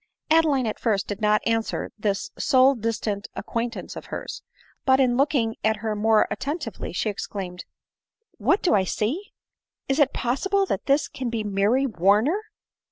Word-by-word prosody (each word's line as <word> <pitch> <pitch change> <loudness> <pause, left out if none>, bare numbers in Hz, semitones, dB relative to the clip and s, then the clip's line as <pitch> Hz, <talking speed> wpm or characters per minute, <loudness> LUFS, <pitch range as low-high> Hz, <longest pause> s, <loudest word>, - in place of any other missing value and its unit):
Adeline 310 -5 +4
at 215 - -3
first 210 -4 +1
did 205 +1 -5
not 210 0 +2
answer 225 -1 -1
this 200 -2 -1
soi 260 +1 +4
distant 220 -3 -2
acquaint 235 0 -3
ance - - -7
of - - -8
hers; - - -6 0.4
but, 265 0 +4
in 250 -2 +3
looking 255 -4 +1
at 220 0 +3
her 215 0 -3
more 215 +1 +3
attentively, 290 -5 -4
she 185 - -2
exclaimed, 190 -3 -5 0.4
" - - -68 0.3
What 390 - +2
do 360 - +3
I 200 -3 +4
see? 255 - -2 0.6
Is 270 +3 0
it 280 -2 +4
possible 385 +11 0
that - - -3
this 280 +2 +3
clan 255 -2 -4
be 230 -2 -2
Mary 210 +6 +2
Warner 220 - +2
230 Hz, 165 wpm, -24 LUFS, 210-270 Hz, 0.6 s, Adeline